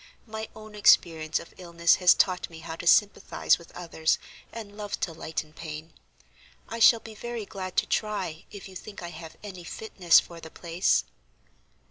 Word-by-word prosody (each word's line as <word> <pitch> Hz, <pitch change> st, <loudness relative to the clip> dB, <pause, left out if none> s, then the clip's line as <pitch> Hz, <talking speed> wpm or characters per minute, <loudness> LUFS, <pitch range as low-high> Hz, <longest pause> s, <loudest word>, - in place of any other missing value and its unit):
My 220 Hz, -1 st, -6 dB
own 215 Hz, 0 st, -11 dB
experience 165 Hz, -6 st, +4 dB
of -, -, -12 dB
illness 170 Hz, -1 st, +3 dB
has 180 Hz, -1 st, +6 dB
taught 185 Hz, -2 st, +1 dB
me 165 Hz, -1 st, -11 dB
how 160 Hz, -, -6 dB
to 170 Hz, -, -6 dB
sympathize 205 Hz, 0 st, +4 dB
with 170 Hz, -, -15 dB
others 165 Hz, -2 st, 0 dB, 0.3 s
and 215 Hz, -3 st, -8 dB
love 205 Hz, -1 st, -5 dB
to 165 Hz, -, -1 dB
lighten 155 Hz, -1 st, -5 dB
pain. 155 Hz, 0 st, -8 dB, 0.7 s
I 230 Hz, -, -5 dB
shall 230 Hz, 0 st, +7 dB
be 225 Hz, -, -10 dB
very 235 Hz, 0 st, -5 dB
glad 185 Hz, -2 st, -7 dB
to -, -, +4 dB
try 190 Hz, -7 st, -2 dB
if 200 Hz, -2 st, -9 dB
you 190 Hz, -, -13 dB
think 200 Hz, 0 st, -9 dB
I 175 Hz, -, -5 dB
have 160 Hz, -1 st, -10 dB
any 185 Hz, -4 st, -8 dB
fitness 180 Hz, -2 st, +3 dB
for 170 Hz, -1 st, -9 dB
the 160 Hz, -, -10 dB
place." 170 Hz, +2 st, +1 dB
180 Hz, 175 wpm, -27 LUFS, 165-210 Hz, 0.7 s, shall